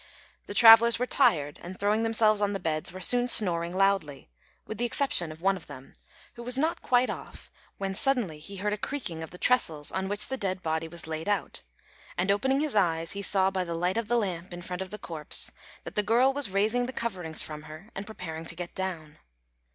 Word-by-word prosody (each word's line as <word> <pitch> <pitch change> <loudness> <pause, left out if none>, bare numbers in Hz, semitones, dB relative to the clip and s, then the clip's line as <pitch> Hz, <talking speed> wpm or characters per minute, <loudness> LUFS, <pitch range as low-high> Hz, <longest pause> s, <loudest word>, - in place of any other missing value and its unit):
The 205 - -6
travellers 230 0 +8
were 250 - 0
tired, 145 - +2
and, 185 +2 -9
throwing 210 +2 +1
themselves 220 -2 +2
on 205 0 +1
the 195 - -3
beds, 155 -2 -2
were 185 +1 -9
soon 245 +4 +3
snoring 175 -6 +4
loudly, 185 - 0 0.3
with 220 - -7
the 240 - +1
exception 235 - +2
of 160 +2 -12
one 195 0 +3
of 180 - -11
them, 135 -2 -12 0.4
who 235 - -10
was 250 +2 +3
not 315 +4 0
quite 250 0 +2
off - - -10 0.3
when 195 -1 -3
suddenly 215 - 0
he 200 +6 -10
heard 205 +2 -2
a 210 - -4
creaking 210 - -4
of 160 - -7
the 180 - -11
trestles 165 -11 +1
on 190 0 -2
which 205 +1 0
the 265 - -3
dead 185 -4 -3
body 160 0 -2
was 170 +1 -4
laid 160 +3 -4
out, 205 - -1 0.6
and, 185 +3 +1
opening 265 +8 +1
his 300 -6 -1
eyes, 165 -4 +1
he 200 - -4
saw 190 -1 +2
by 190 -1 -1
the 170 -1 -5
light 180 +3 -1
of 230 -2 -2
the 240 - +2
lamp 185 -5 -3
in 175 - -9
front 180 0 -5
of 190 - -5
the 210 - -7
corpse 160 -6 -4 0.3
that - - -8
the 210 - +1
girl 240 +6 +3
was 285 -5 0
raising 215 +6 +1
the 260 - -6
coverings 185 -10 -1
from 150 -1 -7
her 160 +9 -12
and 200 +1 -7
preparing 165 -7 -7
to - - -4
get 175 -1 -7
down. 170 -6 -5
195 Hz, 225 wpm, -28 LUFS, 170-225 Hz, 0.6 s, travellers